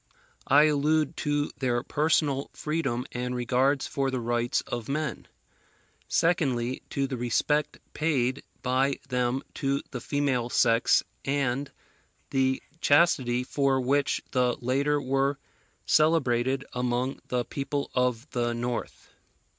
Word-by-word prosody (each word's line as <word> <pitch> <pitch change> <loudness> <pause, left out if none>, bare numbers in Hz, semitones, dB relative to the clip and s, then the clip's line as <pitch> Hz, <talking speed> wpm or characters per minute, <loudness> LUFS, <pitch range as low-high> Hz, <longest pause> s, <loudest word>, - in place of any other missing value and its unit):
I 145 +2 +6
allude 150 0 +2
to 145 0 0
their 120 -2 0
personal 150 -2 +1
freedom 140 -6 -2
and 125 0 -3
regards 130 +3 +1
for 135 -1 -1
the 130 -1 -2
rights 120 0 0
of 120 -1 -5
men; 150 +2 -3 0.8
secondly, 130 -7 +1
to 140 - -1
the 135 -1 -4
respect 140 +5 0 0.2
paid 140 -4 0 0.2
by 130 +2 +1
them 125 +1 0
to 140 0 -1
the 125 - -5
female 135 -3 0
sex 115 +1 +3 0.2
and 135 0 -1 0.6
the 130 0 +1 0.2
chastity 135 -6 +3
for 135 0 +1
which 140 +2 +1
the 125 -2 +1
latter 140 +4 +1
were 135 +1 0 0.5
celebrated 135 -4 +2
among 125 +1 -1
the 125 -1 -1
people 140 0 -3
of 125 0 0
the 120 -1 -1
North. 120 0 -5
135 Hz, 120 wpm, -27 LUFS, 125-145 Hz, 0.8 s, I